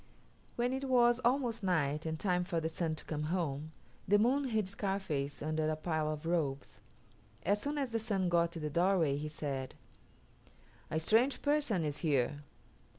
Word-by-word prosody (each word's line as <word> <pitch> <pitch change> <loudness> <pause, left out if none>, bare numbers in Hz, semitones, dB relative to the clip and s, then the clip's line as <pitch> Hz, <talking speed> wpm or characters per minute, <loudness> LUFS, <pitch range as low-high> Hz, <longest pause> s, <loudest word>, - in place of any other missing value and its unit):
When 245 +1 0
it 265 +1 -2
was 240 -2 +4
almost 245 -2 +1
night, 160 -5 0
and 160 0 -3
time 180 -2 +1
for 175 -2 -1
the 160 0 -2
Sun 165 -1 -2
to - - -13
come 150 -2 -3
home, 155 -3 -2 0.4
the 205 +2 +5
Moon 260 +6 +3
hid 220 -6 0
Scarface 190 -9 -2
under 155 0 0
a 155 - 0
pile 155 -1 -1
of 155 +1 -6
robes. 150 -5 -2 0.6
As 205 +1 +1
soon 290 +1 -2
as 270 -4 -1
the 230 - 0
Sun 200 -5 0
got 170 -1 +3
to 165 - -5
the 150 -1 -3
doorway 170 -4 +3
he 150 +1 -3
said, 140 -4 -4 1.1
"A 160 - 0
strange 230 - +2
person 285 - +2
is 145 -1 -2
here." 145 -3 +1
175 Hz, 175 wpm, -33 LUFS, 155-225 Hz, 1.1 s, the